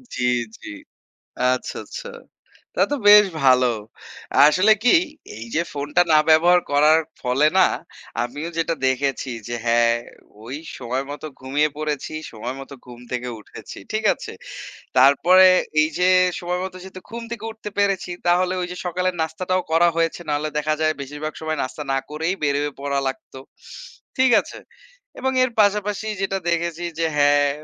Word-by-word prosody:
জ্বি, 125 - -1 0.3
জ্বি। - - -9 0.8
আচ্ছা, 130 - -4
আচ্ছা। 485 - -8 0.7
তা - - +2
তো - - +1
বেশ 210 0 +9 0.2
ভালো। 130 -1 +5 0.8
আসলে 185 +8 +5
কি 245 - +5 0.5
এই 110 - -7
যে, 165 - +2
ফোনটা 145 +4 -1
না 155 - +7
ব্যবহার 175 +3 +5
করার 150 +2 +5 0.2
ফলে 130 +4 +2
না, 185 - +7 0.6
আমিও 145 +7 -5
যেটা 165 0 0
দেখেছি, 135 0 -1 0.2
যে, 120 - -3
হ্যাঁ, 115 0 +3 0.5
ওই 125 +4 -6 0.2
সময় 130 +2 -3
মতো 145 +2 -7
ঘুমিয়ে 140 +4 +1
পড়েছি। 150 -1 -4 0.2
সময় 120 +3 -6
মত 135 - -11 0.2
ঘুম 120 -1 -12
থেকে 125 0 -3
উঠেছি। - - -11
ঠিক - - -2
আছে? - - -9 0.7
তারপরে 165 +8 +6 0.4
এই 155 - +2
যে, 180 - +2 0.3
সময় 180 +1 -3
মতো 190 -1 -6
যেহেতু 190 0 -11
ঘুম 235 +1 -7
থেকে 225 -2 -6
উঠতে 220 -1 -8
পেরেছি, 200 -3 0 0.2
তাহলে 180 +1 +2
ওই 180 - -3
যে, 180 - -7
সকালের 180 +1 -1
নাস্তাটাও 185 +3 -1
করা 165 +2 +4
হয়েছে। 165 +1 0
না 150 - 0
হলে 155 +1 -3
দেখা 150 +1 0
যায় 155 0 +2
বেশিরভাগ 150 +3 -6
সময় 155 0 -2
নাস্তা 130 +3 -6
না - - +2
করেই 160 +4 -2
বের 140 -1 +1
হয়ে 145 -1 -3
পড়া 140 0 -1
লাগতো। 130 0 -7 0.8
ঠিক 260 -1 +4
আছে? - - -11 0.6
এবং 265 - 0
এর 255 - 0
পাশাপাশি 210 +1 0
যেটা 195 0 -1
দেখেছি, 170 0 -2 0.2
যে, 165 - +1
হ্যাঁ, 145 0 +4
155 Hz, 160 wpm, -22 LUFS, 140-180 Hz, 0.8 s, বেশ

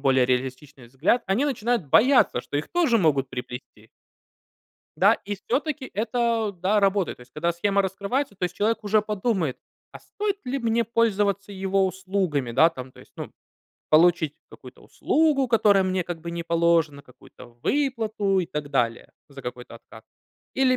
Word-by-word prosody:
более 130 -2 +3
реалистичный 130 +1 -3
взгляд, 160 - +1
они 200 +8 +1
начинают 240 - -1
бояться, 245 - +4
что 145 - -5
их 150 - -3
тоже 325 -10 +2
могут 145 -7 +1
приплести. 125 -3 -8 1.1
Да, - - +5
и 205 - -3
всё-таки 275 +6 -3
это, 225 0 0
да, 205 +3 +3
работает. 195 -2 +1
То - - -18
есть 125 +1 -20
когда 170 +5 -1
схема 200 +3 +1
раскрывается, 200 +7 -2
то 180 - -2
есть 180 0 -3
человек 220 +2 +1
уже 210 +1 +3
подумает: 205 - -1 0.4
"А - - -10
стоит 405 -1 -4
ли 265 +2 -1
мне 230 -1 +1
пользоваться 205 -3 0
его 195 0 +1
услугами, 185 -8 -2
да, 160 +7 +6
там, 130 -5 -9
то - - -16
есть, - - -19
ну, - - -7 0.6
получить 160 -1 +4 0.2
какую-то - - -14
услугу, 300 -4 +1
которая 205 -4 +4
мне 185 0 0
как 175 -1 -6
бы 170 +1 -6
не 170 0 -4
положена, 165 -3 +1
какую-то 125 0 -16 0.2
выплату 220 -8 0
и 175 - -3
так 150 -4 -5
далее 120 -4 -1 0.2
за 140 -1 -12
какой-то 125 0 -8
откат? - - -16 0.5
Или 260 -1 +3
190 Hz, 165 wpm, -24 LUFS, 150-230 Hz, 1.1 s, да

